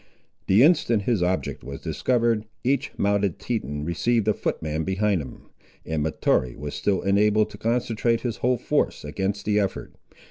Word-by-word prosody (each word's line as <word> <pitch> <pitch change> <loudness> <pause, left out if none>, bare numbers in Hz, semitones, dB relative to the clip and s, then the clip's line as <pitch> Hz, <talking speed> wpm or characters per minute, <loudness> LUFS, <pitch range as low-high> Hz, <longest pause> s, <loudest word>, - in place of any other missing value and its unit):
The 100 +6 +6
instant 130 - +3
his 115 -3 +1
object 90 +1 -1
was 70 0 -7
discovered, 115 -3 0 0.2
each 135 +3 0
mounted 100 -2 +1
Teton 75 - -3
received 110 +6 0
a 110 - +4
footman 80 -3 -2
behind 95 0 +1
him, 65 -3 -11 0.3
and 80 -1 -2
Mahtoree 65 -5 0
was 75 +1 -6
still 100 -2 0
enabled 105 +2 +3
to - - -11
concentrate 115 0 0
his 120 -3 -3
whole 125 +1 +1
force - - -1
against 95 +6 -3
the 105 0 +2
effort. 100 -2 -3
100 Hz, 155 wpm, -24 LUFS, 85-115 Hz, 0.3 s, The